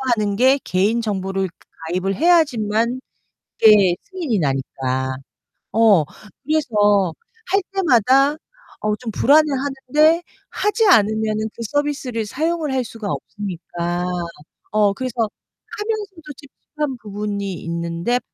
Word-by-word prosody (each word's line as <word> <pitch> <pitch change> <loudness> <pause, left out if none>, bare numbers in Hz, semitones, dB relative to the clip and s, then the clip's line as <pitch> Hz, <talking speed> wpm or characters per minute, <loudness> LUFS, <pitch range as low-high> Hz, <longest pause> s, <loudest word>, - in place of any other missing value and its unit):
하는 205 -2 -1
게 260 +5 +4
개인정보를 195 -1 0 0.4
가입을 185 +3 -1
해야지만 250 -8 +2 0.6
이게 205 -5 +6
승인이 340 - -2
나니까. 130 -2 -2 0.6
어. 210 -7 +5 0.4
그래서 210 - +2 0.4
할 395 +2 +3
때마다 275 - +4 0.5
어 215 0 0
좀 235 0 -6
불안해 290 +8 +5
하는데 285 +4 +2 0.3
하지 435 +2 +1
않으면은 220 - +3
그 - - -8
서비스를 265 -3 -2
사용을 315 +5 -1
할 260 -1 0
수가 225 -2 -7
없으니까. 175 -3 -4 0.7
어 210 -1 +3
그래서 255 +1 -4 0.6
하면서도 410 -8 -4
찝찝한 290 -1 -6
부분이 205 -2 -4
있는데 170 +7 -1
225 Hz, 250 characters per minute, -20 LUFS, 200-290 Hz, 0.7 s, 이게